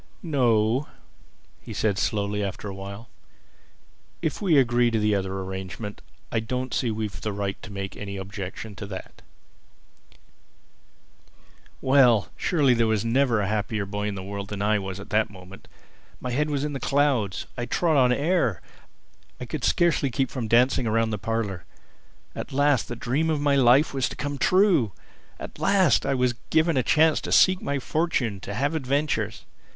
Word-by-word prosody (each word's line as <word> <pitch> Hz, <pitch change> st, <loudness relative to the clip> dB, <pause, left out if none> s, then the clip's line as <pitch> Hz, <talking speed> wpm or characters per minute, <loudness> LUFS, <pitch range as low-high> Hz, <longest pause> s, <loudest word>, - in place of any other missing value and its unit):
"No," 125 Hz, -4 st, +2 dB, 0.7 s
he -, -, -9 dB
said 105 Hz, -3 st, 0 dB
slowly 105 Hz, -1 st, -1 dB
after 100 Hz, +1 st, -5 dB
a 100 Hz, -, -5 dB
while. 100 Hz, +4 st, -8 dB, 1.2 s
"If 155 Hz, -, -2 dB
we 175 Hz, -7 st, +3 dB
agree 120 Hz, -2 st, +3 dB
to 115 Hz, -, 0 dB
the 105 Hz, -1 st, +2 dB
other 95 Hz, -1 st, -2 dB
arrangement 95 Hz, +2 st, -6 dB, 0.3 s
I 115 Hz, -, +1 dB
don't 125 Hz, +2 st, -3 dB
see 125 Hz, -, 0 dB
that 110 Hz, -, -1 dB
we've 105 Hz, -6 st, -4 dB
the 105 Hz, -, -2 dB
right 100 Hz, -1 st, -3 dB
to 105 Hz, -, -10 dB
make 100 Hz, 0 st, -5 dB
any 100 Hz, -1 st, -6 dB
objection 100 Hz, +2 st, -7 dB
to 100 Hz, -, -6 dB
that." 95 Hz, -2 st, -9 dB, 2.6 s
Well, 130 Hz, -5 st, +5 dB
there -, -, -17 dB
surely 145 Hz, -7 st, +2 dB
was 110 Hz, -1 st, +1 dB
never 120 Hz, -2 st, +2 dB
a 100 Hz, -, -1 dB
happier 105 Hz, 0 st, -1 dB
boy 105 Hz, +1 st, -3 dB
in 105 Hz, -, -3 dB
the 95 Hz, -, -6 dB
world 100 Hz, +1 st, -5 dB
than 100 Hz, -1 st, -4 dB
I 105 Hz, 0 st, +2 dB
was 95 Hz, 0 st, -6 dB
at 100 Hz, -, -11 dB
that 110 Hz, 0 st, +2 dB
moment. 95 Hz, 0 st, -13 dB, 0.5 s
My 125 Hz, -, -4 dB
head 150 Hz, +5 st, 0 dB
was 145 Hz, -1 st, -1 dB
in 150 Hz, -, -3 dB
the 135 Hz, -, -4 dB
clouds. 135 Hz, -8 st, +1 dB
I 120 Hz, 0 st, -4 dB
trod 165 Hz, +5 st, +1 dB
on 125 Hz, -3 st, +4 dB
air. 140 Hz, -, +1 dB, 0.8 s
I 125 Hz, -, -5 dB
could 135 Hz, +2 st, -5 dB
scarcely 170 Hz, -5 st, +2 dB
keep 130 Hz, +1 st, -1 dB
from 125 Hz, -4 st, -3 dB
dancing 120 Hz, +2 st, +3 dB
round 115 Hz, 0 st, +1 dB
the 105 Hz, -, -3 dB
parlor. 105 Hz, -4 st, -2 dB, 0.7 s
At -, -, -6 dB
last 140 Hz, -2 st, +2 dB
the 120 Hz, -, -5 dB
dream 135 Hz, +8 st, -1 dB
of 155 Hz, -2 st, +1 dB
my 145 Hz, -1 st, +2 dB
life 135 Hz, +3 st, +4 dB
was 135 Hz, -2 st, 0 dB
to -, -, -8 dB
come 145 Hz, -1 st, -4 dB
true! 180 Hz, -, +3 dB, 0.5 s
At -, -, -9 dB
last 195 Hz, -5 st, +3 dB
I -, -, +1 dB
was 125 Hz, -1 st, +2 dB
to -, -, -12 dB
be -, -, -36 dB
given 160 Hz, 0 st, +3 dB
a 130 Hz, -, +3 dB
chance 155 Hz, +5 st, +3 dB
to -, -, -5 dB
seek 185 Hz, 0 st, +5 dB
my 140 Hz, -, -1 dB
fortune, 135 Hz, -, -1 dB
to 100 Hz, +2 st, -6 dB
have 140 Hz, +6 st, 0 dB
adventures! 135 Hz, -7 st, -1 dB
115 Hz, 180 wpm, -25 LUFS, 100-140 Hz, 2.6 s, Well